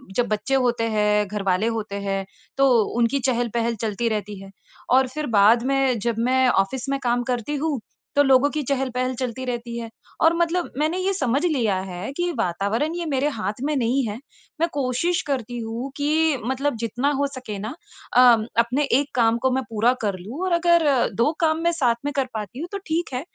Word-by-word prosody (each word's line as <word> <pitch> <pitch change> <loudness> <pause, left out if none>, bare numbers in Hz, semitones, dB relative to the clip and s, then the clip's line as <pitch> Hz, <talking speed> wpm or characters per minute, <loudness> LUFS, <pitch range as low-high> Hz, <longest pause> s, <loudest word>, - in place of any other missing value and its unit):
जब 245 -1 +1
बच्चे 215 +6 -1
होते 240 -3 +1
हैं, 210 -1 +2
घर 205 0 -4
वाले 190 +3 +1
होते 215 -2 -4
हैं 195 -1 -2 0.3
तो 275 0 +5 0.3
उनकी 240 +4 +2
चहल-पहल 235 -2 0
चलती 225 +1 -1
रहती 210 -2 -4
है। 195 - -11 0.4
और 260 +1 +4
फिर 305 +4 -4
बाद 225 +4 +5
में 270 -3 +1
जब 235 +2 -1
मैं 255 +2 +3
ऑफ़िस 240 +7 0
में 275 0 0
काम 245 0 +1
करती 250 +3 -2
हूँ 290 -3 -1 0.4
तो 285 - +5
लोगों 270 +1 +4
की 305 0 -2
चहल-पहल 255 -1 -1
चलती 255 0 -4
रहती 240 -1 -4
है। 230 - -6 0.3
और 325 +1 +5
मतलब 340 +1 0
मैंने 310 +5 0
ये 380 +1 0
समझ 275 -3 0
लिया 245 - +1
है 180 +7 -5
कि 350 0 0
वातावरण 220 - 0
ये 345 -1 -3
मेरे 280 -1 0
हाथ 215 -2 -4
में 300 +1 0
नहीं 260 +1 +1
है। 210 +1 -4 0.4
मैं 335 - +4
कोशिश 285 +6 0
करती 245 -4 -2
हूँ 235 +4 -5
कि 305 0 +2
मतलब 265 +2 -1
जितना 245 +5 0
हो 285 - +2
सके 255 -7 -7
न 205 - -5 0.5
अ, - - +5 0.4
अपने 245 +5 +2
एक 280 +1 +1
काम 230 -1 +3
को 260 - +3
मैं 265 +1 0
पूरा 230 +3 +2
कर 200 -4 -1
लूँ 230 - -7
और 370 - -1
अगर 340 -2 +4 0.3
2 235 +7 +2
काम 315 -1 +2
मैं 340 - +3
साथ 255 -8 +2
में 290 - -1
कर 270 - +2
पाती 220 +3 -6
हूँ 335 - -4
तो 400 - -3
ठीक 320 -2 -1
है 250 - -2
255 Hz, 205 wpm, -23 LUFS, 225-285 Hz, 0.5 s, तो